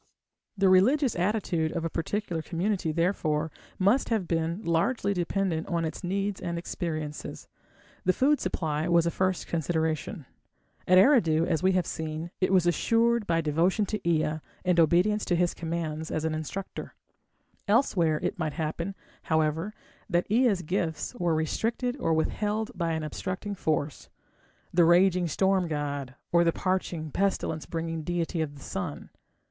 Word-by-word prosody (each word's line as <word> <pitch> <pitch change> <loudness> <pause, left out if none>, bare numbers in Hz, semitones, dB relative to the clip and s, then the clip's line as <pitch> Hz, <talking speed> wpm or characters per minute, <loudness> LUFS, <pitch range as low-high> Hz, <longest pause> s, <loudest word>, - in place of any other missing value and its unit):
The 195 0 +4
religious 235 +9 +4
attitude 175 -4 0
of 165 -1 -2
a - - 0
particular 175 0 -2
community, 180 +1 -1
therefore, 160 -2 0 0.3
must 205 +8 +3
have 215 -6 0
been 165 +4 -1
largely 200 +5 +1
dependent 175 -2 -1
on 170 -1 0
its 160 - -5
needs 195 +2 -2
and 170 0 -3
experiences. 155 -3 -5 0.6
The 185 - +4
food 275 +9 +3
supply 155 -1 -1
was 170 -1 +4
a 170 - +1
first 185 0 0
consideration. 160 - -2 0.6
At 185 - +6
Eridu, 180 - +5
as 165 -3 0
we 190 +1 +3
have 185 -2 +2
seen, 160 +1 -4
it 185 - +2
was 185 -3 +4
assured 230 +6 +2
by 165 -1 +2
devotion 170 +7 +2
to 210 +1 -3
Ea 155 -1 +1 0.3
and 180 -1 +3
obedience 180 +6 +3
to 175 - +1
his 175 0 +1
commands 160 -1 -4
as 155 - -2
an 160 - 0
instructor. 155 +5 -5 0.7
Elsewhere 180 - +3
it - - -2
might 155 -3 -1
happen, 170 +4 -3 0.3
however, 160 +4 0 0.4
that 175 -1 +2
Ea's 220 -6 +3
gifts 160 0 -2
were 175 -9 0
restricted 230 +10 -1
or 165 - 0
withheld 210 +7 0
by 170 -5 -1
an 160 -1 -2
obstructing 185 +6 -4
force 155 -5 -2 0.6
the 175 - +5
raging 175 +1 +4
storm 190 +2 +2
god, 145 -4 -3 0.2
or 170 +1 +5
the 165 - +3
parching, 175 -4 -2
pestilence 190 -4 -1
bringing 165 -1 -3
deity 170 +1 -2
of 145 -2 -3
the 140 - -12
sun. 180 -6 -5
170 Hz, 155 wpm, -28 LUFS, 160-195 Hz, 0.7 s, At